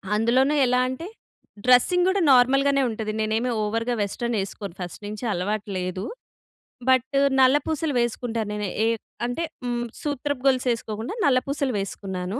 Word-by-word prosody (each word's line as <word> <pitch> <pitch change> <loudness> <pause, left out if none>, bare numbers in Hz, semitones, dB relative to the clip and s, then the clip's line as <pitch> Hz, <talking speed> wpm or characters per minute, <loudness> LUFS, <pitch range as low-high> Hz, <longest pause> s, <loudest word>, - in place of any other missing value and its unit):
అందులోనే 255 +7 +3
ఎలా 250 0 +2
అంటే, 260 +6 -5 0.6
డ్రెస్సింగ్ 355 +9 +5
కూడా 385 +1 +1
నార్మల్‍గానే 275 +2 +4
ఉంటది. 220 -1 -3
నేనేమి 220 +3 0
ఓవర్‌గా 230 +3 -1
వెస్టర్న్ 235 +3 -2
వేసుకోను. 195 -1 -5
ఫస్ట్ 175 +3 -7
నుంచి 215 +3 -7
అలవాటు 205 +4 -2
లేదు. 185 +1 -3 0.9
బట్, 260 +1 +3 0.3
నల్ల 260 +2 +6
పూసలు 315 -2 -1
వేసుకుంటాను. 230 -2 -2
నేను 210 -1 -2 0.2
ఏ - - +3 0.4
అంటే 245 +8 -2 0.6
సూత్రపు 285 -2 -2
గొలుసు 255 -1 +2
వేసుకోకుండా, 225 - -4
నల్ల 260 -3 +4
పూసలు 275 -3 -1
వేసుకున్నాను. 190 +2 -4
245 Hz, 135 wpm, -24 LUFS, 210-265 Hz, 0.9 s, నల్ల